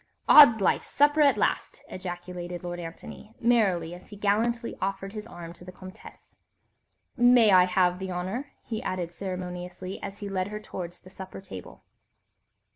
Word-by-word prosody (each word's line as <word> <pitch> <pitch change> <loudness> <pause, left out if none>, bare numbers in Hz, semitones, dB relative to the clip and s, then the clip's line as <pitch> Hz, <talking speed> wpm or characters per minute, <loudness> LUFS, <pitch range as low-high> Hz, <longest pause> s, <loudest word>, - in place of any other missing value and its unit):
"Odd's 285 -7 +10
my 195 - 0
life, - - +2
supper 290 +2 +3
at 285 -2 +5
last!" - - -1
ejaculated 175 -1 -7
Lord 175 0 -5
Antony, 175 +6 -10
merrily, 195 -9 +2
as 180 +1 -12
he 210 - -10
gallantly 230 +4 0
offered 195 +1 -3
his 215 0 -7
arm 170 -6 -9
to 175 - -15
the 185 - -10
Comtesse. 185 +3 -14 0.8
"May 240 -3 +6
I 185 -1 +7
have 180 0 +1
the 190 -1 -5
honour?" 190 +11 -4
he 220 -2 -4
added 175 -2 -4
ceremoniously, 180 0 -6
as 195 - -6
he 205 - -6
led 190 -1 -2
her 210 +1 -6
towards 180 -4 -8
the 185 - -15
supper 190 0 -9
table. 95 - -11
185 Hz, 165 wpm, -27 LUFS, 180-215 Hz, 0.8 s, Odd's